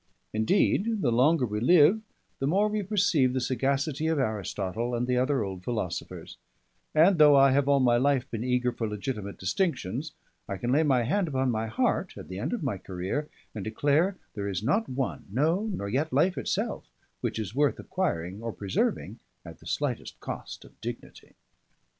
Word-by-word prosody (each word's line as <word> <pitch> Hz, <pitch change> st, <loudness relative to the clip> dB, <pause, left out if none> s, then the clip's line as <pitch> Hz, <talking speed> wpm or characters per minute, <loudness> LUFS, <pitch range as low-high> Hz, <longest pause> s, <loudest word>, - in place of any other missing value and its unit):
Indeed, 200 Hz, -, +2 dB
the 120 Hz, -, +3 dB
longer 130 Hz, +4 st, +4 dB
we 105 Hz, -2 st, -3 dB
live, 170 Hz, -, +5 dB, 0.4 s
the 135 Hz, -, 0 dB
more 195 Hz, +7 st, +3 dB
we 210 Hz, 0 st, -1 dB
perceive 180 Hz, -10 st, +2 dB
the 130 Hz, -, 0 dB
sagacity 135 Hz, +4 st, 0 dB
of 160 Hz, -1 st, +1 dB
Aristotle 110 Hz, -1 st, -2 dB
and 120 Hz, +1 st, 0 dB
the 125 Hz, 0 st, 0 dB
other 130 Hz, 0 st, +1 dB
old 95 Hz, -2 st, -6 dB
philosophers; 95 Hz, -6 st, -4 dB, 0.6 s
and 170 Hz, +3 st, +5 dB
though 150 Hz, -1 st, +8 dB
I 135 Hz, -1 st, +6 dB
have 140 Hz, +1 st, +2 dB
all 140 Hz, -1 st, +5 dB
my 120 Hz, -2 st, +4 dB
life 135 Hz, 0 st, +2 dB
been 115 Hz, 0 st, -3 dB
eager 125 Hz, 0 st, +1 dB
for 115 Hz, -2 st, -3 dB
legitimate 105 Hz, -1 st, -4 dB
distinctions, 135 Hz, -, -2 dB, 0.4 s
I 100 Hz, -, -3 dB
can 120 Hz, +6 st, -2 dB
lay 145 Hz, +4 st, +4 dB
my 135 Hz, -6 st, +3 dB
hand 175 Hz, -, +1 dB
upon 130 Hz, -3 st, 0 dB
my 110 Hz, 0 st, -1 dB
heart, 110 Hz, -, -1 dB
at -, -, -9 dB
the 95 Hz, +1 st, -5 dB
end -, -, -2 dB
of 240 Hz, -8 st, -3 dB
my 115 Hz, -9 st, -2 dB
career, 95 Hz, +13 st, -4 dB, 0.2 s
and 105 Hz, -, -5 dB
declare 145 Hz, -, +1 dB, 0.2 s
there 100 Hz, -1 st, -3 dB
is 95 Hz, 0 st, -3 dB
not 205 Hz, -, +1 dB
one 130 Hz, -1 st, -3 dB
no, 160 Hz, -, +1 dB
nor 100 Hz, -, -4 dB
yet 140 Hz, +9 st, -1 dB
life 165 Hz, +8 st, +3 dB
itself -, -, -2 dB, 0.3 s
which -, -, -3 dB
is 105 Hz, -2 st, -4 dB
worth 145 Hz, +2 st, +2 dB
acquiring 105 Hz, -, -3 dB
or 115 Hz, 0 st, -3 dB
preserving 100 Hz, -3 st, -2 dB, 0.3 s
at -, -, -10 dB
the -, -, -13 dB
slightest -, -, -3 dB
cost -, -, -7 dB
of -, -, -20 dB
dignity. 120 Hz, +1 st, -8 dB
130 Hz, 185 wpm, -28 LUFS, 110-155 Hz, 0.6 s, though